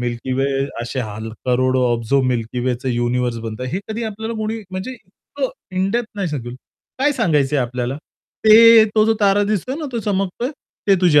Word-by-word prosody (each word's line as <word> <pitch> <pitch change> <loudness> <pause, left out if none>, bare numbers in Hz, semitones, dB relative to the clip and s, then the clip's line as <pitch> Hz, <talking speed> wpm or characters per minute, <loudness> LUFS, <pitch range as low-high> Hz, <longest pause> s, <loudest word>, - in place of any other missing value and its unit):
Milky 120 +1 -3
वे 135 +1 +1 0.4
असे 125 +2 -3
ह 110 -3 -5 0.3
करोडो 130 +1 +2
ऑब्झो 120 +4 +1
मिल्की 125 -1 -1
वेच 125 +1 -2
युनिव्हर्स 120 0 0
बनतं. 115 +2 -5
हे 175 +10 -3
कधी 220 +2 -3
आपल्याला 220 +1 -4
कोणी 220 +1 -3
म्हणजे 185 +6 -5
इतकं - - -6 0.3
इन 190 +1 +1
डेप्थ 240 +1 -1
नाही 195 -4 -1
सांगेल. 120 -5 -5 0.4
काय 290 +2 +3
सांगायचंय 150 - +1
आपल्याला? 125 +1 -2 0.5
ते 225 +1 +9
तो 215 -1 +5
जो 225 +1 +3
तारा 200 0 +4
दिसतोय 215 +5 -1
ना 310 - -4
तो 235 - -1
चमकतोय 200 +4 -2 0.4
ते 200 - +7
तुझे 160 -5 +5
150 Hz, 175 wpm, -20 LUFS, -, 0.5 s, ते